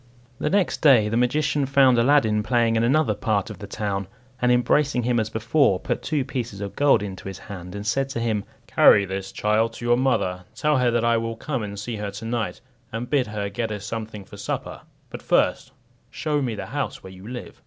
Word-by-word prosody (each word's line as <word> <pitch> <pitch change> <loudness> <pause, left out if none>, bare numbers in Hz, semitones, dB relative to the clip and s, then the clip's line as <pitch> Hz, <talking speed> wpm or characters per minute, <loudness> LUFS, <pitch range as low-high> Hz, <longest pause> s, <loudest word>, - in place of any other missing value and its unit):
The - - 0
next 200 -1 +1
day 125 -9 +6
the 115 - -1
magician 145 +3 +1
found 135 -3 +5
Aladdin 115 -4 +3
playing 115 0 +2
in 115 - +2
another 135 -1 +3
part 105 -1 -1
of - - -10
the 100 - -8
town, 100 -2 -3 0.3
and 125 0 +3
embracing 125 +2 +2
him 120 0 +1
as 110 -1 -1
before, 115 -1 +2
put - - -3
two 150 -4 -1
pieces 120 -7 -4
of 100 -1 -6
gold 140 -7 +4
into 95 -2 -7
his 95 -1 -6
hand, 90 -2 -9
and 100 0 -6
said 135 +5 0
to 125 - -3
him, 110 -3 -1 0.2
"Carry 100 - +5
this, 95 0 -5
child, 110 +3 +1
to 120 - -8
your 120 0 +4
mother; 95 -9 0
tell 150 -2 +2
her 125 -1 +3
that 120 0 +1
I 115 0 +3
will 115 0 -3
come 130 +1 -3
and 100 -1 -5
see 110 +2 -4
her 105 -1 -4
to 100 +3 -8
night, 115 -2 -3 0.3
and 120 +2 -5
bid 135 -5 +2
her 105 -1 -3
get 115 +2 -3
us 105 -1 -5
something 110 -2 -6
for - - -12
supper; - - -4 0.3
but - - -7
first - - +1 0.4
show 150 -2 -1
ms 120 -5 -2
the - - -5
house - - -4
where 95 - -10
you 95 +2 -12
live." 125 0 -8
115 Hz, 220 wpm, -24 LUFS, 105-130 Hz, 0.4 s, day